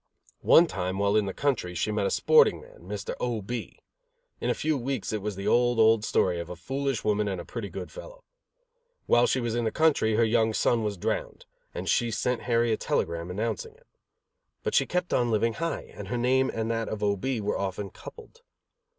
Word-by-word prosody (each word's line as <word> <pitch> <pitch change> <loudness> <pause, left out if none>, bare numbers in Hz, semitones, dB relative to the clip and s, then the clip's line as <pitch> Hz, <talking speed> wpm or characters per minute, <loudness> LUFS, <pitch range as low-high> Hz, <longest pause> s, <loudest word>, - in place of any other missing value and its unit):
One 170 - +7
time, 95 - -3
while 100 +1 +2
in 105 -2 +2
the - - -2
country, 110 -8 -1
she 95 +5 -1
met 105 -2 0
a - - 0
sporting - - +4
man, - - -16
Mr. 105 -1 -4
O. 120 -2 -1
B. 115 +3 -6 0.6
In - - -2
a - - +1
few 155 0 0
weeks 130 -4 -3
it 105 - -2
was 105 0 -3
the 100 +2 -5
old, 120 +2 +3
old 110 -1 +5
story 90 -4 +1
of 85 - -6
a 90 - -6
foolish 135 +7 -3
woman 105 0 +1
and 95 -3 -2
a 85 - -7
pretty 115 -4 -6
good - - -7
fellow. - - -11 0.8
While 120 +1 +4
she 130 - +1
was 120 -2 -2
in 120 0 0
the 110 - 0
country, 145 -9 +2
her 115 - +4
young 110 -1 +2
son 115 -2 +2
was 105 -2 -2
drowned, - - -3 0.3
and - - -6
she 120 - +2
sent 125 +2 -1
Harry 115 0 +3
a - - 0
telegram 85 +1 -2
announcing 115 - -3
it. - - -25 0.8
But - - -2
she - - +3
kept 180 0 -1
on 120 -1 +2
living 115 +1 +1
high 165 0 -3
and - - -8
her 125 - -2
name 130 +2 +2
and 115 0 -2
that 115 -1 -2
of 105 -1 -4
O. 100 -1 +2
B. 125 +5 -2
were 105 -1 -2
often 100 0 -3
coupled. 465 +1 -13
115 Hz, 220 wpm, -27 LUFS, 100-125 Hz, 0.8 s, One